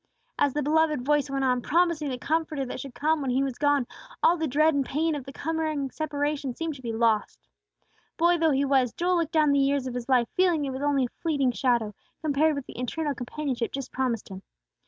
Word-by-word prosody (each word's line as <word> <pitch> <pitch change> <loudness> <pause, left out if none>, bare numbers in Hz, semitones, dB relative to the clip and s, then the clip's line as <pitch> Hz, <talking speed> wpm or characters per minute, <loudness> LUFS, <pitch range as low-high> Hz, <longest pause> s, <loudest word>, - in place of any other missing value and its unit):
As 285 -2 +2
the 295 - 0
beloved 305 -2 +2
voice 295 -1 +2
went 275 0 -1
on, 250 -1 +2
promising 335 -1 +1
the 255 - -3
Comforter 310 -1 -1
that 250 - -6
should 265 -2 -8
come 310 +1 +1
when 270 - -2
He 260 +2 +2
was 265 -3 -4
gone, 290 -3 +2 0.4
all 340 - +6
the 320 -2 -2
dread 305 +4 +3
and 280 -1 +1
pain 315 +5 0
of 285 -4 -5
the 270 - -8
coming 310 -3 -2
separation 290 -3 -2
seemed 330 -1 -3
to 275 - -12
be 235 -2 -4
lost. 225 -1 0 0.7
Boy 345 +1 +3
though 325 -1 +3
he 280 -1 +2
was, 265 -4 +2
Joel 355 +1 +1
looked 330 -2 -1
down 305 -2 +4
the 280 - +3
years 275 -1 +1
of 255 - -4
his 245 +1 -5
life 250 -3 +3
feeling 350 -5 +2
it 270 - -3
was 260 +1 -5
only 285 -2 +2
a 245 - -12
fleeting 285 -6 +1
shadow, 235 -4 0 0.3
compared 305 +1 +2
with 280 -2 -5
the - - -10
eternal 290 +4 -2
companionship 250 -1 -3
just 270 -2 -5
promised 250 -4 -2
him. 190 -1 -8
280 Hz, 225 wpm, -26 LUFS, 255-310 Hz, 0.7 s, all